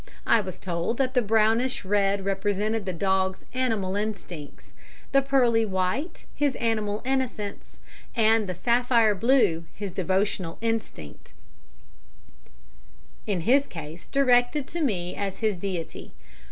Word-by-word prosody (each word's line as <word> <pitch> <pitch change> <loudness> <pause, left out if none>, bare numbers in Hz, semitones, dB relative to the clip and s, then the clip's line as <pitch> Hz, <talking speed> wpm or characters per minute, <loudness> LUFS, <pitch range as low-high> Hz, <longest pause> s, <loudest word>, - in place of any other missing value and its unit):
I 230 - +4
was 185 -2 -7
told 175 +5 -2
that 260 -1 0
the 250 - +3
brownish 225 +3 +2
red 200 0 +1
represented 205 +2 -1
the - - 0
dog's 190 +1 0
animal 220 -7 0
instincts, 195 -8 -6 0.4
the 275 - +5
pearly 250 -4 +3
white 200 - -2
his 285 -3 0
animal 215 -2 -1
innocence, 255 -6 -3 0.4
and 220 -2 +3
the 185 - -3
sapphire 235 +2 +3
blue 205 -6 +2
his 200 -3 -5
devotional 190 -2 -1
instinct, 225 - -4 1.9
in 195 -5 0
his 270 +9 +3
case 160 0 -9
directed 260 +1 +3
to 340 - -3
me 180 - -1
as 195 -1 -3
his 215 -3 +1
deity. 180 -3 -5
210 Hz, 125 wpm, -26 LUFS, 190-245 Hz, 1.9 s, the